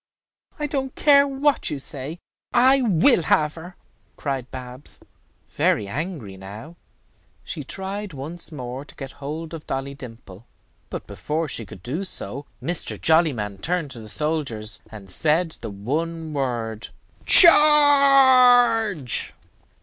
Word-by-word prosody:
"I 300 Hz, -, -3 dB
don't 270 Hz, -2 st, -4 dB
care 285 Hz, -1 st, +4 dB
what 275 Hz, +1 st, 0 dB
you 150 Hz, -, -4 dB
say; 140 Hz, +3 st, -6 dB, 0.4 s
I 260 Hz, +2 st, +4 dB
will 215 Hz, -, +3 dB
have 150 Hz, -1 st, +1 dB
her," 175 Hz, +2 st, -11 dB, 0.4 s
cried 135 Hz, -3 st, -4 dB
Babs, 130 Hz, +1 st, -10 dB, 0.5 s
very 105 Hz, -, 0 dB
angry 135 Hz, -, -6 dB
now. 105 Hz, -, -11 dB, 0.7 s
She -, -, -6 dB
tried 195 Hz, +1 st, -6 dB
once 155 Hz, +5 st, -7 dB
more 130 Hz, -2 st, -7 dB
to -, -, -17 dB
get 135 Hz, -1 st, -8 dB
hold 155 Hz, +4 st, -7 dB
of 160 Hz, -2 st, -9 dB
Dolly 135 Hz, +1 st, -4 dB
Dimple; 120 Hz, -5 st, -13 dB, 0.4 s
but -, -, -7 dB
before 160 Hz, +2 st, -4 dB
she 115 Hz, -6 st, -3 dB
could 90 Hz, 0 st, -13 dB
do 150 Hz, -, -4 dB
so, 140 Hz, -, -2 dB, 0.2 s
Mr. 175 Hz, 0 st, -2 dB
Jollyman 135 Hz, -, +2 dB
turned 165 Hz, -, -2 dB
to 125 Hz, -, -7 dB
the 110 Hz, -1 st, -10 dB
soldiers, 140 Hz, -6 st, -3 dB
and 105 Hz, -3 st, -12 dB
said 160 Hz, -, 0 dB
the -, -, -6 dB
one 155 Hz, +10 st, -4 dB
word, 120 Hz, -5 st, -4 dB, 0.4 s
"Charge." 260 Hz, -, +6 dB
155 Hz, 130 wpm, -22 LUFS, 125-195 Hz, 0.7 s, Charge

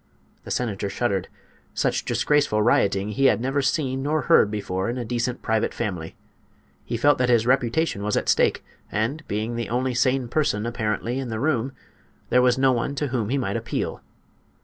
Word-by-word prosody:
The -, -, -8 dB
senator 105 Hz, -5 st, -2 dB
shuddered. 100 Hz, -2 st, -1 dB, 0.5 s
Such -, -, 0 dB
disgraceful 145 Hz, -8 st, +2 dB
rioting 100 Hz, -2 st, +2 dB
he 120 Hz, +6 st, 0 dB
had 135 Hz, -, +4 dB
never 135 Hz, +4 st, 0 dB
seen 135 Hz, -2 st, 0 dB
nor 150 Hz, +2 st, 0 dB
heard 165 Hz, -10 st, +5 dB
before 100 Hz, -2 st, -2 dB
in 120 Hz, -, -3 dB
a 120 Hz, -, -3 dB
decent 120 Hz, +1 st, -2 dB
private 110 Hz, -1 st, 0 dB
family. 90 Hz, -8 st, -4 dB, 0.7 s
He 115 Hz, -, -3 dB
felt 145 Hz, +4 st, +3 dB
that 125 Hz, -1 st, +2 dB
his 115 Hz, -2 st, +4 dB
reputation 125 Hz, 0 st, +1 dB
was 105 Hz, +1 st, 0 dB
at -, -, -1 dB
stake, -, -, +2 dB, 0.3 s
and, 115 Hz, +9 st, -1 dB
being 110 Hz, +3 st, -2 dB
the 120 Hz, -, -3 dB
only 125 Hz, +2 st, 0 dB
sane 125 Hz, +1 st, +1 dB
person, 120 Hz, -6 st, 0 dB
apparently, 115 Hz, +2 st, -2 dB
in 130 Hz, -2 st, -4 dB
the 110 Hz, -1 st, -3 dB
room, 135 Hz, -2 st, 0 dB, 0.6 s
there 125 Hz, -, +5 dB
was 125 Hz, 0 st, +3 dB
no 135 Hz, 0 st, +4 dB
one 125 Hz, +3 st, -1 dB
to 145 Hz, 0 st, -2 dB
whom 120 Hz, -5 st, -1 dB
he 140 Hz, -, +1 dB
might 100 Hz, -7 st, -1 dB
appeal. -, -, -3 dB
120 Hz, 185 wpm, -24 LUFS, 110-135 Hz, 0.7 s, heard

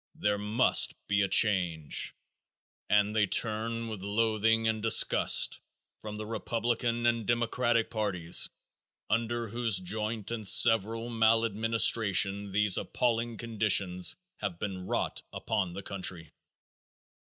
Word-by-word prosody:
THERE 105 Hz, 0 st, -1 dB
MUST 105 Hz, +5 st, +3 dB
BE 100 Hz, 0 st, +1 dB
A 100 Hz, -, +1 dB
CHANGE! 90 Hz, -8 st, +1 dB, 0.7 s
And 105 Hz, +1 st, +1 dB
they 105 Hz, -2 st, +2 dB
turn 115 Hz, +2 st, 0 dB
with 110 Hz, -4 st, -7 dB
loathing 110 Hz, +2 st, 0 dB
and 110 Hz, -1 st, -2 dB
disgust 115 Hz, 0 st, +4 dB, 0.4 s
from 105 Hz, -1 st, -8 dB
the 110 Hz, -, -6 dB
Republican 115 Hz, +1 st, -3 dB
and 115 Hz, -2 st, 0 dB
Democratic 120 Hz, 0 st, 0 dB
parties 95 Hz, -6 st, -1 dB, 0.6 s
under 115 Hz, +1 st, -2 dB
whose 115 Hz, -2 st, +2 dB
joint 105 Hz, +3 st, -5 dB
and 110 Hz, -3 st, -2 dB
several 115 Hz, +2 st, +4 dB
maladministration 110 Hz, -3 st, +1 dB
these 105 Hz, -1 st, +3 dB
appalling 115 Hz, -1 st, -2 dB
conditions 105 Hz, -5 st, 0 dB, 0.2 s
have 100 Hz, -5 st, -5 dB
been 95 Hz, -1 st, -6 dB
brought -, -, -3 dB
upon 95 Hz, -3 st, -3 dB
the 100 Hz, +2 st, -8 dB
country. 90 Hz, -4 st, -6 dB
110 Hz, 115 wpm, -28 LUFS, 100-115 Hz, 0.7 s, disgust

